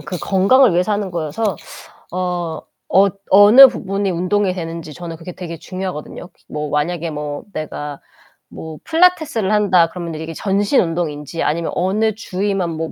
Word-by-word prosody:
그 150 Hz, +4 st, -6 dB
건강을 200 Hz, +4 st, +4 dB
위해서 180 Hz, +4 st, +1 dB
하는 205 Hz, -2 st, -2 dB
거여서 170 Hz, +5 st, -2 dB, 0.6 s
어 175 Hz, -2 st, -3 dB, 0.3 s
어 195 Hz, +1 st, +5 dB, 0.2 s
어느 210 Hz, +7 st, +9 dB
부분이 195 Hz, -4 st, -2 dB
운동이 185 Hz, +2 st, 0 dB
되는지 165 Hz, -3 st, -6 dB
저는 170 Hz, 0 st, -8 dB
그게 165 Hz, +3 st, -9 dB
되게 170 Hz, -2 st, -7 dB
중요하거든요. 180 Hz, -1 st, -6 dB
기 -, -, -33 dB
뭐 150 Hz, 0 st, -4 dB
만약에 165 Hz, +3 st, -1 dB
뭐 150 Hz, -1 st, -5 dB
내가 150 Hz, -3 st, -6 dB, 0.5 s
뭐 160 Hz, -1 st, -9 dB
필라테스를 320 Hz, -, +2 dB
한다 190 Hz, -5 st, +3 dB
그러면 170 Hz, -1 st, -6 dB
이게 160 Hz, +1 st, -6 dB
전신 200 Hz, -, +1 dB
운동인지 165 Hz, -2 st, -3 dB
아니면 165 Hz, +2 st, -1 dB
어느 210 Hz, +5 st, +1 dB
주위만 195 Hz, -3 st, -2 dB
뭐 160 Hz, 0 st, -4 dB
180 Hz, 340 characters per minute, -18 LUFS, 165-200 Hz, 0.6 s, 어느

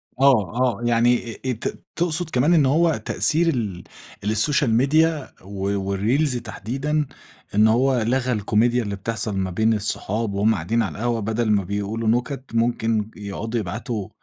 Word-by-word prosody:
آه 130 Hz, -7 st, +4 dB, 0.3 s
آه -, -, -11 dB
يعني 120 Hz, +1 st, +3 dB, 0.2 s
آآ، -, -, -12 dB
آآ، -, -, +3 dB
ت 110 Hz, -, -5 dB
تقصد 170 Hz, -1 st, -1 dB
كمان 145 Hz, +5 st, +2 dB
إن 155 Hz, -4 st, +5 dB
هو 160 Hz, +4 st, +3 dB
تأثير 165 Hz, +2 st, +1 dB
ال 105 Hz, -, -2 dB, 0.4 s
السوشال 115 Hz, +4 st, +2 dB
ميديا 150 Hz, +4 st, +2 dB
و 100 Hz, +1 st, -2 dB
والريلز 125 Hz, +8 st, +1 dB
تحديدًا 135 Hz, +7 st, -2 dB, 0.5 s
إن 105 Hz, +1 st, +6 dB
هو 125 Hz, +2 st, +3 dB
لغى 125 Hz, +2 st, 0 dB
الكوميديا 115 Hz, +3 st, +2 dB
اللي 100 Hz, -2 st, -3 dB
بتحصل 110 Hz, 0 st, -3 dB
ما 95 Hz, -1 st, -1 dB
بين 110 Hz, +5 st, +2 dB
الصحاب 105 Hz, 0 st, -2 dB
وهُم 105 Hz, +3 st, +2 dB
قاعدين 105 Hz, +7 st, 0 dB
على 100 Hz, -, -5 dB
القهوة 120 Hz, +1 st, -1 dB
بدل 110 Hz, +1 st, 0 dB
ما 100 Hz, -2 st, +2 dB
بيقولوا 105 Hz, +4 st, -3 dB
نُكت 125 Hz, +4 st, 0 dB
ممكن 115 Hz, -1 st, +1 dB
بيقعُدوا 105 Hz, +2 st, -5 dB
يبعتوا 110 Hz, +1 st, -4 dB
115 Hz, 155 wpm, -22 LUFS, 105-130 Hz, 0.5 s, إن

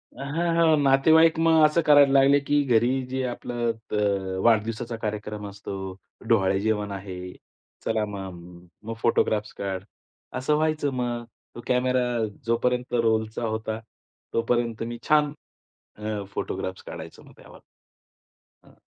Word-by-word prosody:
हां, 165 Hz, +5 st, -1 dB
हां, 165 Hz, -2 st, +4 dB
नातेवाईक 160 Hz, +4 st, +5 dB
मग 165 Hz, -1 st, +5 dB
असं 155 Hz, +2 st, +3 dB
करायला 145 Hz, -2 st, +7 dB
लागले 140 Hz, +1 st, +6 dB
की 145 Hz, +1 st, +1 dB
घरी 120 Hz, -2 st, +3 dB, 0.2 s
जे 130 Hz, +1 st, -2 dB
आपलं 120 Hz, -1 st, -3 dB, 0.2 s
अ, 100 Hz, -3 st, 0 dB
वाढदिवसाचा 115 Hz, +1 st, +1 dB
कार्यक्रम 105 Hz, -1 st, -4 dB
असतो, 100 Hz, 0 st, -8 dB, 0.5 s
डोहाळे 95 Hz, -4 st, +3 dB
जेवण 105 Hz, -1 st, -1 dB
आहे, 95 Hz, -2 st, -7 dB, 0.5 s
चला 110 Hz, -1 st, +1 dB
मग. 90 Hz, -3 st, -9 dB, 0.2 s
मग 115 Hz, +2 st, -5 dB
फोटोग्राफ्स 105 Hz, -2 st, +1 dB
काढ 95 Hz, -1 st, -4 dB, 0.5 s
असं 135 Hz, +4 st, +1 dB
व्हायचं 155 Hz, -2 st, 0 dB
मग. 120 Hz, -2 st, -2 dB, 0.3 s
तो 120 Hz, -, -7 dB
कॅमेरा 125 Hz, 0 st, +2 dB, 0.4 s
जोपर्यंत 125 Hz, +2 st, 0 dB
रोलचा 110 Hz, -1 st, +1 dB
होता, 110 Hz, 0 st, -3 dB, 0.5 s
तोपर्यंत 115 Hz, -1 st, 0 dB
मी 120 Hz, +1 st, -5 dB
छान 150 Hz, -1 st, +4 dB, 0.6 s
अ, 105 Hz, -1 st, -3 dB
फोटोग्राफ्स 95 Hz, -1 st, -4 dB
काढायचो -, -, -9 dB
मग -, -, -17 dB
त्यावर. -, -, -15 dB, 1.0 s
हां. -, -, -22 dB
115 Hz, 125 wpm, -25 LUFS, 105-135 Hz, 1.0 s, करायला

